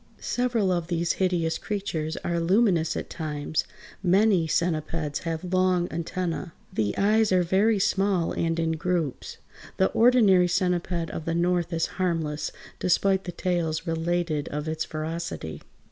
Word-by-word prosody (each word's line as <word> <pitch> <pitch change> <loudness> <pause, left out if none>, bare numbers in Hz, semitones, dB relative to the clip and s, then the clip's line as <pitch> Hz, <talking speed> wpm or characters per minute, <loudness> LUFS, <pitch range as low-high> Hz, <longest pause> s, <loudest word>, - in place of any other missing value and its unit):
Several 240 -6 0
of 175 -2 -1
these 170 -1 0
hideous 175 -3 +1
creatures 165 -7 -3
are 170 0 0
luminous 180 -2 +2
at - - -4
times. 155 -1 -3 0.4
Many 190 -2 +3
centipeds 155 -2 -1
have 165 +2 -3
long 185 -1 +2
antennæ. 170 0 -3 0.2
The 105 -2 -1
eyes 215 +1 +3
are 180 -1 +4
very 200 +5 +3
small, 195 -3 +1
and 165 0 -1
in 165 0 +1
groups. 160 -3 -2 0.4
The 190 - +3
ordinary 220 -7 +5
centiped 175 -2 0
of 160 - -6
the 165 - -1
North 175 0 +1
is 165 -1 +1 0.2
harmless, 160 -4 -1 0.3
despite 190 +2 +2
the 175 - -4
tales 170 -2 -1
related 165 -2 -1
of 150 +1 -4
its 160 0 -1
ferocity. 155 - -5
175 Hz, 140 wpm, -26 LUFS, 160-185 Hz, 0.4 s, ordinary